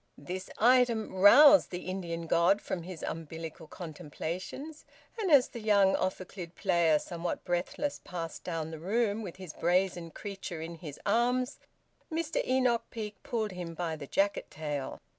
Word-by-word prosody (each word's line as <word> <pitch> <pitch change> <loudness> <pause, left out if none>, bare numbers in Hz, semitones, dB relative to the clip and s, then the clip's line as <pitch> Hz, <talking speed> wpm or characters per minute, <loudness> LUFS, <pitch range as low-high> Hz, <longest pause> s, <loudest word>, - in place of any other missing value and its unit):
This 185 +6 -6
item 240 -2 +4
roused 275 +10 +8
the 180 0 -5
Indian 170 -3 -4
god 170 +5 +4
from 185 - -4
his 175 -1 -8
umbilical 160 0 -6
contemplations, 175 - -6 0.4
and 405 -4 0
as 280 -5 +6
the 235 - -7
young 200 -3 +4
ophicleide 185 -2 -4
player, 170 -5 +3
somewhat 170 +3 -4
breathless, 175 +11 -2
passed 165 -3 -6
down 165 -2 -3
the 160 - -7
room 210 +4 0
with 185 -6 -7
his 185 -5 -9
brazen 175 0 +1
creature 195 -2 -6
in 165 +1 -5
his 150 -5 -8
arms, 245 +5 +1 0.5
Mr 325 0 -1
Enoch 255 -2 +2
Peake 210 -2 -6
pulled 225 -5 -2
him 175 -2 -6
by 165 -1 -2
the 145 -2 -8
jacket 200 +5 0
tail. 150 -3 -4
185 Hz, 150 wpm, -30 LUFS, 165-225 Hz, 0.5 s, roused